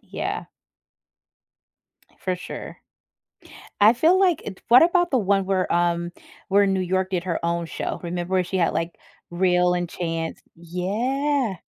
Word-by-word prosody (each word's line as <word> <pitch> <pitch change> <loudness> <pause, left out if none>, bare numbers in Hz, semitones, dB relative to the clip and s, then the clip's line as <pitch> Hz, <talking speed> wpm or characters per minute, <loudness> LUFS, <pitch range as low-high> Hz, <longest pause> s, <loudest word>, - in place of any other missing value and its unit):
Yeah. - - -5 1.7
For 185 -1 -2
sure. 180 - -8 1.1
I 215 +3 +7
feel 330 +9 +3
like 370 -4 +3
it 195 -3 -8
what 240 +5 +8
about 350 0 +2
the 260 - +3
one 195 -2 +1
where, 190 -1 0
um, 175 0 0 0.4
where 200 +1 +5
in 195 -1 +2
New 190 - 0
York 185 +1 0
did 180 -2 -2
her 170 -2 -3
own 170 0 -1
show, - - -4
remember 180 +2 -1
she 190 +2 -3
had, 170 - +1
like, 165 +1 -2 0.4
Real 180 0 +2
and 175 -1 -2
Chance 165 -2 -4
yeah. 220 - -1
185 Hz, 150 wpm, -23 LUFS, 175-215 Hz, 1.7 s, what